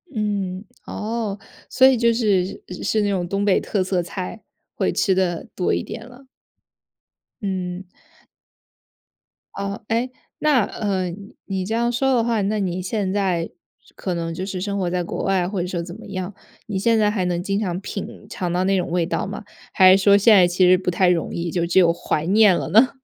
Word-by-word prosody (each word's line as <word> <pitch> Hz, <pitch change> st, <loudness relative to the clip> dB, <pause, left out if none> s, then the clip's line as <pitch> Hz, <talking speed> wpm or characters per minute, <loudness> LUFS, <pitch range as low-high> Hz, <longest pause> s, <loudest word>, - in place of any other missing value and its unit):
嗯， 200 Hz, -3 st, -2 dB, 0.2 s
哦。 215 Hz, -2 st, -3 dB, 0.3 s
所 260 Hz, -, +5 dB
以 265 Hz, -1 st, +4 dB
就 235 Hz, 0 st, +3 dB
是 200 Hz, -5 st, 0 dB, 0.2 s
是 215 Hz, -, +1 dB
那 205 Hz, -, +1 dB
种 180 Hz, -3 st, -1 dB
东 200 Hz, +2 st, -1 dB
北 200 Hz, -2 st, +3 dB
特 200 Hz, -3 st, -1 dB
色 185 Hz, -1 st, 0 dB
菜， 185 Hz, +4 st, -6 dB, 0.3 s
会 -, -, 0 dB
吃 195 Hz, -, +2 dB
得 180 Hz, -3 st, -1 dB
多 180 Hz, -, 0 dB
一 -, -, -1 dB
点 225 Hz, -, -8 dB
了。 255 Hz, +2 st, -16 dB, 1.1 s
嗯。 185 Hz, -1 st, -4 dB, 1.7 s
哦。 200 Hz, +2 st, -5 dB
诶， 235 Hz, +3 st, 0 dB, 0.3 s
那， 285 Hz, -8 st, +3 dB
呃， 190 Hz, -4 st, -2 dB
你 200 Hz, +3 st, -11 dB
你 190 Hz, -2 st, -3 dB
这 220 Hz, -, -3 dB
样 235 Hz, +1 st, +1 dB
说 265 Hz, +2 st, +1 dB
的 230 Hz, -, +2 dB
话， 230 Hz, -3 st, 0 dB
那 210 Hz, +2 st, 0 dB
你 185 Hz, -1 st, -2 dB
现 195 Hz, 0 st, -2 dB
在 185 Hz, -4 st, 0 dB, 0.5 s
可 185 Hz, -, -3 dB
能 165 Hz, -1 st, -3 dB
就 185 Hz, +3 st, -4 dB
是 190 Hz, -2 st, -4 dB
生 200 Hz, +1 st, -2 dB
活 180 Hz, -2 st, 0 dB
在 180 Hz, 0 st, -1 dB
国 -, -, -4 dB
外 190 Hz, -2 st, +1 dB
或 190 Hz, -1 st, -2 dB
者 180 Hz, -, -2 dB
说 175 Hz, -2 st, -3 dB
怎 175 Hz, +2 st, -8 dB
么 220 Hz, -, -12 dB
样， 185 Hz, 0 st, -5 dB, 0.3 s
你 205 Hz, -3 st, -3 dB
现 230 Hz, +3 st, +3 dB
在 210 Hz, -1 st, +3 dB
还 195 Hz, -4 st, -1 dB
能 175 Hz, -1 st, -1 dB
经 195 Hz, +2 st, -1 dB
常 180 Hz, -4 st, -2 dB
品 195 Hz, 0 st, -7 dB
尝 180 Hz, -2 st, -3 dB
到 180 Hz, +1 st, +1 dB
那 195 Hz, 0 st, +2 dB
种 180 Hz, -, -2 dB
味 175 Hz, -2 st, +1 dB
道 -, -, -2 dB
吗？ 205 Hz, +3 st, -6 dB, 0.3 s
还 185 Hz, 0 st, +7 dB
是 195 Hz, -, 0 dB
说 200 Hz, 0 st, +6 dB
现 215 Hz, +2 st, +6 dB
在 180 Hz, -3 st, +6 dB
其 180 Hz, +1 st, +3 dB
实 185 Hz, -, +6 dB
不 180 Hz, -1 st, -2 dB
太 180 Hz, +1 st, +3 dB
容 170 Hz, -2 st, 0 dB
易， 170 Hz, 0 st, -3 dB
就 170 Hz, 0 st, 0 dB
只 170 Hz, +2 st, +3 dB
有 170 Hz, -2 st, +5 dB
怀 155 Hz, -2 st, -2 dB
念 200 Hz, 0 st, +5 dB
了 -, -, -3 dB
呢？ 230 Hz, +6 st, +6 dB
195 Hz, 220 characters per minute, -22 LUFS, 180-210 Hz, 1.7 s, 还